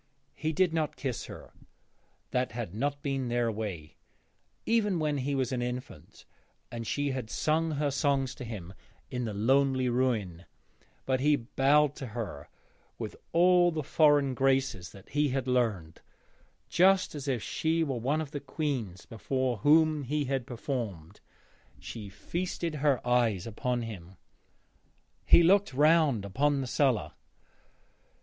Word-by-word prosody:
He 155 0 -2
did 175 +1 +2
not 155 -2 -1
kiss 130 -5 -4
her - - -11 0.8
that 125 -2 -1
had 115 -7 -5
not 140 +6 -2
been 135 -2 -1
their 120 -1 0
way, 95 -9 -6 0.7
even 210 -5 +2
when 150 -3 0
he 140 +2 -1
was 130 -2 -1
an 125 -2 -1
infant 125 +1 -7 0.5
and 115 -1 -5
she 145 -1 -1
had 130 -4 -4
sung 160 +4 0
her 145 0 0
songs 140 -2 0
to 140 - -9
him 100 -6 -7 0.4
in 125 -1 -2
the 110 - -4
lonely 130 +3 +2
ruin 110 -9 -1 0.6
but 130 -1 +1
he 150 +2 +4
bowed 140 +3 +2
to 135 - -6
her 90 -11 -5 0.5
with - - -6 0.2
all 175 +1 +5
the 160 -3 -3
foreign 145 -2 +3
graces 135 -9 0
that 100 0 -15
he 145 +1 +1
had 135 -1 -2
learned, 110 -11 -1 0.7
just 190 +2 +3
as 145 -2 -6
if 125 -5 -1
she 165 +1 0
were 135 -6 -2
one 140 +7 0
of 150 -3 -6
the 145 - -4
queens 130 - -4
before 130 +2 -2
whom 155 +5 +4
he 145 +2 -1
had 135 -2 -2
performed. 110 - -5 0.6
She 105 -3 -8
feasted 170 - -4
her 140 -5 +2
eyes 120 -7 +2
upon 120 +2 -2
him. 95 -5 -8 1.1
He 170 - +7
looked 195 -2 +4
round 150 -7 +4
upon 140 +8 +1
the 135 - -2
cellar. 130 -2 +1
135 Hz, 145 wpm, -29 LUFS, 115-150 Hz, 1.1 s, He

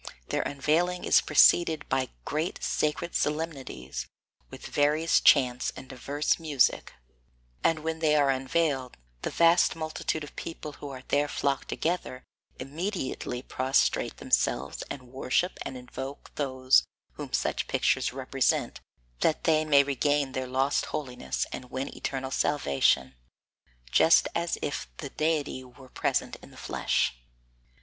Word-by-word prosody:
their - - 0
unveiling 165 +6 0
is - - +5
preceded 160 -4 +4
by 130 0 0 0.2
great 155 +4 -2
sacred 155 +3 -1
solemnities 135 - -3 0.4
with - - -11
various 150 +3 +2
chants 125 -3 +4
and 130 - -10
diverse 140 +5 -1
music, 150 -6 +1 0.7
and 160 -2 +2
when 160 0 -2
they 155 -2 +3
are 140 -2 +4
unveiled, 135 0 -1 0.2
the - - -2
vast 170 +1 +4
multitude 155 -1 -3
of 145 - -11
people 160 -2 -6
who 145 0 -9
are 130 -1 -8
there 145 +1 +2
flocked 140 -1 -1
together, 160 -6 -2 0.3
immediately 135 -4 -4
prostrate 130 0 +1
themselves - - 0
and 125 -3 -8
worship 135 +7 0
and 130 - -5
invoke 130 +2 -8
those 130 -2 +3 0.3
whom - - -8
such - - -1
pictures - - +1
represent - - 0 0.4
that 155 - +1
they 155 -1 +3
may 145 -2 +5
regain 145 0 +1
their 130 0 -3
lost 135 +2 +1
holiness 95 - -3
and 125 - -7
win 130 +1 -4
eternal 135 -1 -4
salvation, 70 - +2 0.8
just 160 - +5
as 170 0 -1
if 145 - -3
the 140 - -6
deity 155 -4 -1
were 130 +1 -15
present - - -1
in - - -15
the - - -16
flesh. - - 0
140 Hz, 135 wpm, -28 LUFS, 130-155 Hz, 0.8 s, is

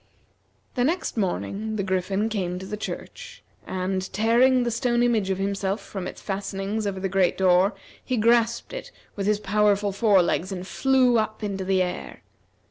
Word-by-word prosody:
The 245 - 0
next 335 +8 0
morning, 215 +1 -2
the 200 - -1
Griffin 190 +2 0
came 185 -5 -2
to 190 - -7
the 210 +2 -4
church, 210 - -7 0.2
and 185 0 -2
tearing 245 +4 +4
the 240 - -1
stone 240 +1 +1
image 225 -5 +2
of 190 - 0
himself 195 +1 -1
from 190 -3 -6
its - - -8
fastenings 200 +1 -3
over 195 -1 -3
the 195 - -1
great 190 -1 +2
door, 185 +2 +4 0.3
he 255 - -1
grasped 235 - +2
it - - -7 0.2
with 200 -1 -2
his 210 -1 +2
powerful 205 0 +2
fore 200 -2 +4
legs 180 +2 -1
and 185 -1 -5
flew 255 +1 +3
up 215 0 -3
into 195 -2 -2
the 190 0 +2
air. 180 0 -6
200 Hz, 175 wpm, -25 LUFS, 190-225 Hz, 0.3 s, tearing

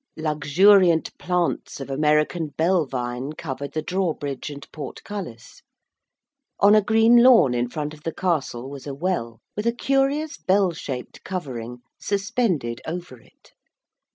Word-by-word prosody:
Luxuriant 160 +4 +4
plants 180 -4 -1
of 135 0 -6
American 150 +3 +1
bell 165 +2 +1
vine 125 +2 -4
covered 140 -3 -6
the 155 - -2
drawbridge 160 -8 -2
and 140 -1 -9
portcullis. 155 - -8 1.0
On 200 +1 +6
a 215 - +6
green 225 +3 +5
lawn 235 - +6
in 120 0 -1
front 150 +2 -4
of 150 - -14
the 165 - -3
castle 150 -9 -2
was 140 0 -9
a 140 - -5
well, 140 -9 -3
with 210 +2 -2
a - - +4
curious 275 +5 0
bell 190 -1 +2
shaped 135 -6 -7
covering 125 -9 -6 0.2
suspended 195 - -1
over 165 -6 -6
it. - - -25
155 Hz, 135 wpm, -23 LUFS, 135-190 Hz, 1.0 s, On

